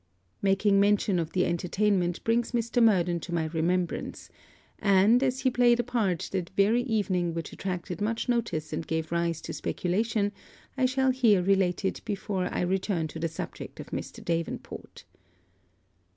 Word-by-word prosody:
Making 195 Hz, +1 st, +3 dB
mention 200 Hz, -2 st, +3 dB
of 165 Hz, -2 st, -2 dB
the 180 Hz, -, +2 dB
entertainment 180 Hz, 0 st, 0 dB
brings 230 Hz, +2 st, +1 dB
Mr. 235 Hz, +1 st, +1 dB
Murden 180 Hz, -6 st, +3 dB
to 175 Hz, -, -8 dB
my 165 Hz, -2 st, 0 dB
remembrance; 170 Hz, +2 st, -2 dB, 0.5 s
and, 200 Hz, +4 st, +4 dB
as 260 Hz, -1 st, 0 dB
he 260 Hz, -1 st, +2 dB
played 240 Hz, -1 st, +4 dB
a -, -, +2 dB
part 215 Hz, -8 st, -1 dB
that 185 Hz, -3 st, -2 dB
very 215 Hz, +5 st, +4 dB
evening 195 Hz, -8 st, 0 dB
which 165 Hz, -, -5 dB
attracted 180 Hz, -1 st, -4 dB
much 225 Hz, +4 st, -1 dB
notice 230 Hz, -11 st, -1 dB
and 160 Hz, -, -4 dB
gave 160 Hz, 0 st, -2 dB
rise 170 Hz, -1 st, 0 dB
to -, -, -6 dB
speculation, 205 Hz, +3 st, -1 dB, 0.4 s
I 260 Hz, -1 st, +2 dB
shall 265 Hz, 0 st, +2 dB
here 225 Hz, -8 st, +3 dB
relate 190 Hz, 0 st, +2 dB
it 190 Hz, -, -1 dB
before 200 Hz, -3 st, -2 dB
I -, -, -1 dB
return 180 Hz, -2 st, 0 dB
to 160 Hz, -, -7 dB
the 165 Hz, -, 0 dB
subject 160 Hz, -, -7 dB
of -, -, -9 dB
Mr. -, -, -6 dB
Davenport. 165 Hz, -1 st, -4 dB
195 Hz, 160 wpm, -28 LUFS, 175-225 Hz, 0.5 s, and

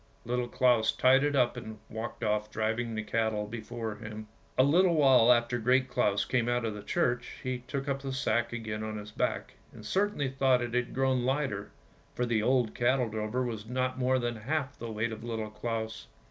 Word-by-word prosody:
Little 125 Hz, +1 st, -1 dB
Claus 120 Hz, -3 st, +3 dB
tied 130 Hz, +2 st, +4 dB
it 145 Hz, 0 st, +1 dB
up 125 Hz, -2 st, +3 dB
and 110 Hz, -3 st, -7 dB
walked 115 Hz, +2 st, -6 dB
off 105 Hz, 0 st, 0 dB
driving 110 Hz, +1 st, -1 dB
the 110 Hz, -, -2 dB
cattle 110 Hz, -1 st, 0 dB
before 110 Hz, 0 st, -5 dB
him. 110 Hz, 0 st, -8 dB, 0.3 s
A 130 Hz, -, +6 dB
little 170 Hz, +5 st, +4 dB
while 130 Hz, -5 st, +6 dB
after 120 Hz, 0 st, +2 dB
Great 130 Hz, +3 st, +3 dB
Claus 100 Hz, -4 st, +1 dB
came 120 Hz, -2 st, +1 dB
out 120 Hz, -1 st, +1 dB
of 110 Hz, -, -2 dB
the 105 Hz, -, -7 dB
church, 125 Hz, -4 st, -1 dB
he 130 Hz, -1 st, -2 dB
took 140 Hz, +1 st, -3 dB
up 140 Hz, -1 st, -1 dB
the 135 Hz, -1 st, -4 dB
sack 120 Hz, -3 st, 0 dB
again 110 Hz, -2 st, -4 dB
on 110 Hz, 0 st, -4 dB
his 105 Hz, 0 st, -8 dB
back, -, -, -2 dB, 0.2 s
and 110 Hz, -, -12 dB
certainly 195 Hz, -, 0 dB
thought 130 Hz, -1 st, +3 dB
it 120 Hz, -1 st, -5 dB
had 125 Hz, 0 st, -1 dB
grown 130 Hz, -1 st, +2 dB
lighter, 130 Hz, -6 st, -1 dB, 0.5 s
for 125 Hz, -, 0 dB
the 115 Hz, -2 st, +1 dB
old 125 Hz, -1 st, +2 dB
cattle 125 Hz, -1 st, +2 dB
drover 110 Hz, +4 st, -2 dB
was 110 Hz, -3 st, -4 dB
not 130 Hz, +1 st, -1 dB
more 130 Hz, 0 st, +2 dB
than 120 Hz, -2 st, -2 dB
half 135 Hz, +4 st, -2 dB
the 115 Hz, -1 st, -5 dB
weight 110 Hz, +2 st, -1 dB
of 110 Hz, 0 st, -7 dB
Little 110 Hz, -2 st, -4 dB
Claus. 110 Hz, 0 st, -4 dB
120 Hz, 200 wpm, -30 LUFS, 110-130 Hz, 0.5 s, A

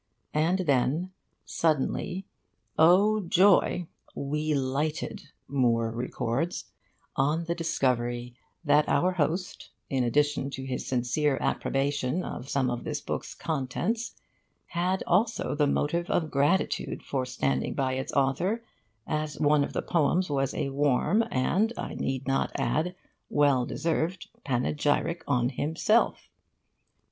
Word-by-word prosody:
And 160 Hz, +5 st, +2 dB
then 145 Hz, +6 st, +1 dB, 0.3 s
suddenly 165 Hz, +4 st, 0 dB, 0.5 s
oh 195 Hz, +7 st, +5 dB
joy! 185 Hz, -1 st, +4 dB, 0.3 s
'we 150 Hz, +2 st, -1 dB
lighted,' 140 Hz, +2 st, -2 dB, 0.2 s
Moore 115 Hz, -4 st, +1 dB
records, 125 Hz, +6 st, -2 dB, 0.4 s
'on 150 Hz, +5 st, +1 dB
the 170 Hz, -, 0 dB
discovery 125 Hz, -7 st, -1 dB, 0.3 s
that 150 Hz, +1 st, +4 dB
our 185 Hz, -, +3 dB
host, 180 Hz, +2 st, -2 dB, 0.2 s
in 130 Hz, -2 st, +1 dB
addition 145 Hz, +2 st, +1 dB
to 135 Hz, -1 st, -6 dB
his 130 Hz, -1 st, -4 dB
sincere 130 Hz, +3 st, +1 dB
approbation 140 Hz, +3 st, 0 dB
of 125 Hz, +3 st, -6 dB
some 130 Hz, -3 st, +1 dB
of 120 Hz, -, -4 dB
this -, -, -3 dB
book's -, -, -5 dB
contents, 165 Hz, -, -2 dB, 0.5 s
had 180 Hz, +2 st, -1 dB
also 220 Hz, +6 st, +1 dB
the 145 Hz, 0 st, +2 dB
motive 170 Hz, +5 st, 0 dB
of 160 Hz, -3 st, 0 dB
gratitude 145 Hz, +7 st, +1 dB
for 135 Hz, -2 st, -2 dB
standing 70 Hz, -, -1 dB
by 130 Hz, -1 st, 0 dB
its 130 Hz, 0 st, -3 dB
author, 170 Hz, -, +1 dB, 0.4 s
as 155 Hz, -1 st, -3 dB
one 150 Hz, -1 st, +4 dB
of -, -, -4 dB
the -, -, -2 dB
poems 170 Hz, +1 st, +1 dB
was 135 Hz, -1 st, +1 dB
a 140 Hz, -, -1 dB
warm 145 Hz, -, +2 dB
and, 190 Hz, -, +1 dB
I -, -, -4 dB
need 135 Hz, 0 st, -3 dB
not 135 Hz, 0 st, +1 dB
add, 175 Hz, +4 st, 0 dB, 0.3 s
well 140 Hz, -4 st, +3 dB
deserved 170 Hz, +2 st, -2 dB, 0.2 s
panegyric 145 Hz, +5 st, 0 dB
on 125 Hz, 0 st, +2 dB
himself. 160 Hz, -, +1 dB
145 Hz, 125 wpm, -28 LUFS, 130-170 Hz, 0.5 s, oh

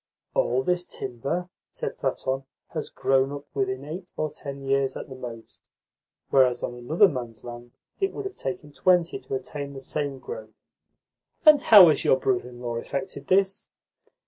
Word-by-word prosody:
"All 125 Hz, +2 st, +2 dB
this 180 Hz, +3 st, 0 dB
timber," 135 Hz, +8 st, -3 dB, 0.2 s
said -, -, -5 dB
Platon, 135 Hz, 0 st, -1 dB, 0.2 s
"has -, -, -4 dB
grown 135 Hz, 0 st, +2 dB
up 145 Hz, 0 st, -6 dB
within 130 Hz, 0 st, -1 dB
eight 175 Hz, +5 st, -7 dB
or 155 Hz, -1 st, -1 dB
ten 140 Hz, -2 st, -8 dB
years 135 Hz, 0 st, +1 dB
at -, -, -8 dB
the -, -, -7 dB
most; 120 Hz, -3 st, -9 dB, 0.7 s
whereas 125 Hz, -2 st, +4 dB
on -, -, -2 dB
another 150 Hz, -, +4 dB
man's 120 Hz, -, -6 dB
land 120 Hz, 0 st, -9 dB, 0.3 s
it 390 Hz, 0 st, +1 dB
would 415 Hz, -, -6 dB
have 390 Hz, -, -5 dB
taken 175 Hz, -5 st, -5 dB
twenty 175 Hz, +2 st, +2 dB
to -, -, -5 dB
attain 140 Hz, +1 st, -5 dB
the 135 Hz, -, -7 dB
same 140 Hz, 0 st, -3 dB
growth." -, -, -8 dB, 0.9 s
"And 305 Hz, -2 st, +8 dB
how 200 Hz, -5 st, +10 dB
has 150 Hz, -, +2 dB
your 130 Hz, -, +4 dB
brother 125 Hz, -2 st, 0 dB
in 120 Hz, -1 st, -12 dB
law 120 Hz, -1 st, -3 dB
effected 140 Hz, +3 st, -5 dB
this?" 195 Hz, +1 st, +2 dB
140 Hz, 170 wpm, -26 LUFS, 130-175 Hz, 0.9 s, how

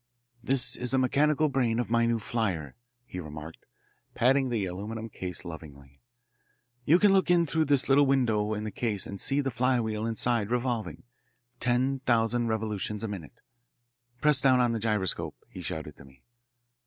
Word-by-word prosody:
"This 125 Hz, -2 st, +2 dB
is 125 Hz, -, -2 dB
the 135 Hz, -, +2 dB
mechanical 150 Hz, +4 st, +2 dB
brain 125 Hz, -5 st, 0 dB
of 120 Hz, -2 st, -3 dB
my 115 Hz, 0 st, +3 dB
new 115 Hz, 0 st, +1 dB
flier," 100 Hz, -, -2 dB, 0.3 s
he 90 Hz, -, -7 dB
remarked, 75 Hz, 0 st, -9 dB, 0.5 s
patting 130 Hz, +2 st, +3 dB
the 110 Hz, -5 st, -1 dB
aluminum 105 Hz, +5 st, -6 dB
case 90 Hz, -3 st, -7 dB
lovingly. 70 Hz, -4 st, -11 dB, 0.8 s
"You 165 Hz, -, +6 dB
can 200 Hz, +1 st, +4 dB
look 190 Hz, -2 st, +2 dB
in 175 Hz, -1 st, +4 dB
through 160 Hz, +1 st, 0 dB
this 140 Hz, -2 st, +2 dB
little 140 Hz, +1 st, +5 dB
window 110 Hz, -6 st, +1 dB
in 105 Hz, -, -4 dB
the 110 Hz, -, -4 dB
case 105 Hz, -5 st, -2 dB
and 100 Hz, -, -4 dB
see 140 Hz, +1 st, +2 dB
the 135 Hz, -1 st, -2 dB
flywheel 115 Hz, -3 st, 0 dB
inside 115 Hz, -1 st, 0 dB
revolving 120 Hz, -2 st, -2 dB, 0.6 s
ten 130 Hz, +2 st, +1 dB
thousand 120 Hz, -1 st, +1 dB
revolutions 105 Hz, -1 st, -2 dB
a -, -, -1 dB
minute. 95 Hz, -8 st, -8 dB, 0.8 s
Press 150 Hz, -2 st, +3 dB
down 130 Hz, -2 st, +4 dB
on 120 Hz, -1 st, +3 dB
the 115 Hz, -, -2 dB
gyroscope," 105 Hz, -4 st, -1 dB
he 90 Hz, -, -10 dB
shouted 80 Hz, -4 st, -5 dB
to 70 Hz, -, -14 dB
me. 65 Hz, -1 st, -20 dB
115 Hz, 165 wpm, -28 LUFS, 100-130 Hz, 0.8 s, You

